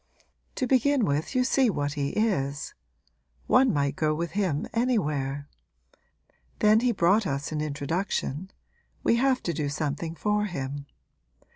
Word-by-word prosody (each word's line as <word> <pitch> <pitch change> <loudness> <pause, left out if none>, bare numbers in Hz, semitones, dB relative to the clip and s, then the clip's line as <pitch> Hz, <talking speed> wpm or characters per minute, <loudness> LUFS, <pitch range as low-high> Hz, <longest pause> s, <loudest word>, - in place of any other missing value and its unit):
To 260 - 0
begin 260 0 +3
with 150 - -1
you 255 - +4
see 260 -1 +3
what 145 -6 -1
he 140 -2 -1
is. 145 -11 -1 0.7
One 255 -1 +4
might 140 -3 0
go 155 -1 +1
with 170 +2 -3
him 185 -8 0
anywhere. 150 - 0 1.1
Then 215 +1 +5
he 245 +1 +2
brought 195 +1 +3
us 140 +2 -3
an 155 -1 -2
introduction 155 +2 -2 0.5
we 230 - +3
have 260 +1 +2
to 170 - -1
do 145 -2 -2
something 155 +2 -3
for 210 +3 0
him. 140 -6 -5
170 Hz, 140 wpm, -27 LUFS, 145-225 Hz, 1.1 s, Then